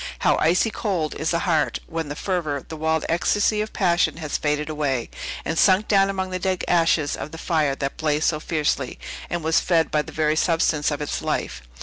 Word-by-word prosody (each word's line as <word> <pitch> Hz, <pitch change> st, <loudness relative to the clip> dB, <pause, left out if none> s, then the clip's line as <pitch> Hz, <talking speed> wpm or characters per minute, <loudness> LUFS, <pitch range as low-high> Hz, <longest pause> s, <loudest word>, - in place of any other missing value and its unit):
How -, -, +3 dB
icy 180 Hz, +8 st, +3 dB
cold 180 Hz, -10 st, -2 dB
is 155 Hz, -, -2 dB
the 170 Hz, -, +1 dB
heart, 160 Hz, -5 st, +1 dB
when 165 Hz, -2 st, -4 dB
the 145 Hz, -, -4 dB
fervor, 160 Hz, -7 st, -2 dB
the 160 Hz, -, -7 dB
wild 160 Hz, 0 st, 0 dB
ecstasy 205 Hz, +5 st, +1 dB
of 215 Hz, -, -4 dB
passion 175 Hz, -4 st, +1 dB
has 155 Hz, -3 st, -4 dB
faded 150 Hz, 0 st, 0 dB
away, 145 Hz, -6 st, -2 dB, 0.3 s
and 165 Hz, -, -1 dB
sunk 195 Hz, +2 st, +4 dB
down 195 Hz, -1 st, +4 dB
among 190 Hz, -1 st, -3 dB
the 185 Hz, -, -2 dB
dead 185 Hz, 0 st, -1 dB
ashes 165 Hz, -4 st, +2 dB
of -, -, -6 dB
the 165 Hz, -, -8 dB
fire 155 Hz, -4 st, 0 dB
that 140 Hz, 0 st, -4 dB
blazed 155 Hz, 0 st, 0 dB
so 155 Hz, -, +1 dB
fiercely, 150 Hz, -5 st, -1 dB, 0.3 s
and 175 Hz, -2 st, -3 dB
was 160 Hz, +1 st, +3 dB
fed 165 Hz, -3 st, +1 dB
by 150 Hz, -, +2 dB
the -, -, -10 dB
very 155 Hz, -1 st, +1 dB
substance 160 Hz, -2 st, +2 dB
of 150 Hz, 0 st, -3 dB
its 150 Hz, -, -3 dB
life! -, -, -2 dB
160 Hz, 210 wpm, -23 LUFS, 150-180 Hz, 0.3 s, sunk